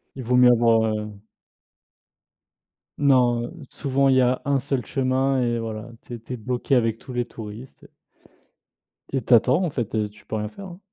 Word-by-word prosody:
il 130 - -6
vaut 125 +2 +1
mieux 125 0 +7
avoir, 115 -1 +4
heu 105 0 -5 1.9
Non, 125 -4 +3
heu, - - -8 0.2
souvent 140 -2 0
il 135 - +4
y 130 - +5
a 125 +1 +1
un 140 -1 +2
seul 135 -2 -2
chemin 135 0 0
et 120 -1 0
voilà, 110 -1 -5 0.2
tu 120 - -10
es 115 - -9
tu 120 +3 -8
es - - -4
bloqué 125 +4 -2
avec 115 -2 +1
tous 130 - -10
les 120 -1 -1
touristes 110 +3 -10
et - - -16 1.2
et 135 - -1
tu 125 - +3
attends 130 - +4
en 175 - 0
fait, 120 -6 -4
heu, 105 -1 0
tu 105 - -20
peux 110 - -5
rien 105 -1 -3
faire, 200 - -11
hein. 180 -1 -10
125 Hz, 205 wpm, -23 LUFS, 115-135 Hz, 1.9 s, mieux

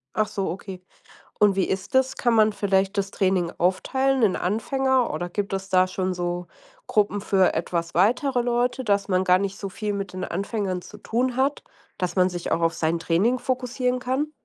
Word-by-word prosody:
Ach 215 - +2
so, 195 -4 -3
okay. 185 +1 -7 0.6
Und 205 -2 +5
wie 190 - +2
ist 190 +6 -3
das? 260 0 +2
Kann 240 -2 +2
man 215 -1 +4
vielleicht 195 -1 +1
das 195 -1 -1
Training 185 -3 +1
aufteilen 265 +9 +1
in 205 -4 +3
Anfänger, 260 +6 0
oder 175 - -3
gibt 200 +3 -3
es 195 0 -3
da 185 -1 +4
schon 185 0 -2
so 175 0 -3 0.4
Gruppen 205 -1 +1
für 195 -2 +3
etwas 170 0 -2
weitere 245 - +2
Leute, 245 +2 0
dass 200 -2 +1
man 185 -1 +2
gar 180 0 +5
nicht 200 +1 -3
so 195 - -4
viel 210 +2 -3
mit 200 -1 -4
den 185 0 -3
Anfängern 200 -3 -2
zu 210 - -12
tun 245 +4 -1
hat, 275 +2 +1 0.4
dass 180 -1 -2
man 185 0 +4
sich 175 -1 -4
auch - - +1
auf 165 0 +3
sein 160 +1 0
Training 190 +10 +1
fokussieren 250 0 -1
kann? 260 +5 -2
200 Hz, 195 wpm, -24 LUFS, 185-245 Hz, 0.6 s, Und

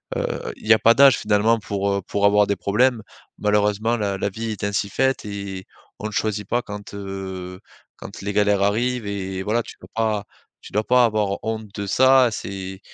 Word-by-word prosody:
heu, - - -3
il - - -12
y 115 - +8
a 110 - +3
pas 115 - +6
d'âge, 135 +1 +6
finalement, 110 +2 +2
pour, 100 -2 -2
heu, 100 0 0
pour 100 0 0
avoir 105 0 +5
des 100 - +1
problèmes. 115 +4 +1 0.4
Malheureusement, 105 +2 +1
la 100 -3 -1
la 100 - -1
vie 110 +3 -5
est 105 - -7
ainsi 100 0 -1
faite 130 +3 0
et 100 -2 -6 0.3
on - - -7
ne - - -7
choisit 105 -2 -2
pas 120 +3 0
quand, 105 -3 -9
heu, 95 -2 -6 0.4
quand - - -10
les 100 - -3
galères 105 -1 +2
arrivent 115 +4 0
et 95 -2 -4
voilà 110 +4 +1
tu - - -12
peux - - -14
pas 110 -2 0 0.4
tu - - -12
dois 105 +2 0
pas 125 0 +5
avoir 105 -3 0
honte 110 -1 -3
de 100 - -4
ça. 130 +4 +5
C'est 95 -2 -6
105 Hz, 205 wpm, -22 LUFS, 100-115 Hz, 0.4 s, y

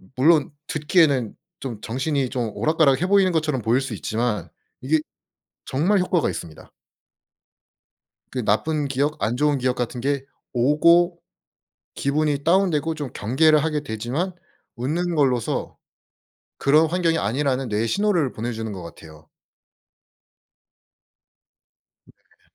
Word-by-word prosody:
물론 150 +3 +4 0.2
듣기에는 150 - +2 0.2
좀 120 -6 -6
정신이 135 +3 -1
좀 120 -4 -2
오락가락해 155 -1 +2
보이는 195 -1 +4
것처럼 155 -6 0
보일 115 +5 +2
수 135 - -5
있지만 115 -1 -2 0.3
이게 155 +5 +2 0.7
정말 170 +10 +1
효과가 180 - +1
있습니다. 85 -3 -9 1.6
그 125 -2 -3
나쁜 145 +8 +1
기억 140 +3 -1
안 115 - 0
좋은 145 +2 +2
기억 125 -1 0
같은 125 0 -3
게 140 +1 -1 0.3
오고 170 +7 +4 0.8
기분이 145 0 0
다운되고 165 -3 +2
좀 145 -4 -5
경계를 150 +7 +3
하게 155 -1 -1
되지만 125 - -3 0.4
웃는 170 +8 -2
걸로서 130 -7 0 0.8
그런 150 +3 +4
환경이 165 -1 +1
아니라는 130 +3 -1
뇌에 110 +2 0
신호를 180 - +1
보내주는 110 -1 -4
것 95 -3 -7
같아요. 80 -2 -13 2.8
네. - - -28
140 Hz, 260 characters per minute, -23 LUFS, 120-160 Hz, 2.8 s, 물론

